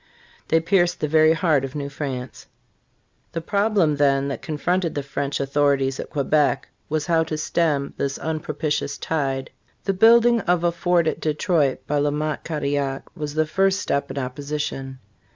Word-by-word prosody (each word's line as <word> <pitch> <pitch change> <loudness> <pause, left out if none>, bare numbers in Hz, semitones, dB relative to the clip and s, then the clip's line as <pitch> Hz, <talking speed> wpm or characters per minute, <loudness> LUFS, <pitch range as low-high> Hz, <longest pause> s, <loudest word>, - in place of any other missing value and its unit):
"* - - -29
They 160 - +3
pierced 175 +1 +2
the 150 - 0
very 155 +1 +5
heart 160 -5 +2
of 135 +1 -5
New 140 -1 -3
France. 135 -4 -6 0.9
The 165 - -1
problem, 200 -5 +1
then, 140 -1 +2
that 140 - -4
confronted 170 +3 -1
the 145 - -2
French 140 0 -3
authorities 140 -1 +1
at - - -5
Quebec 145 0 +1 0.2
was 155 0 -1
how 165 -2 +3
to 155 -1 -3
stem 155 -3 0
this 140 0 -2
unpropitious 150 -2 -2
tide. 135 -4 -2 0.3
The 195 - 0
building 235 +4 +6
of 175 -2 +1
a 175 - +3
Fort 175 0 +1
at 160 - -1
Detroit 155 -2 0
by 145 0 0
La 145 +1 +2
Mothe 150 +1 -2
Cadillac 140 -3 -2
was 150 -3 -5
the 155 0 +2
first 195 +4 +2
step 140 - -1
in - - -6
opposition. 135 0 -4
150 Hz, 170 wpm, -23 LUFS, 140-165 Hz, 0.9 s, building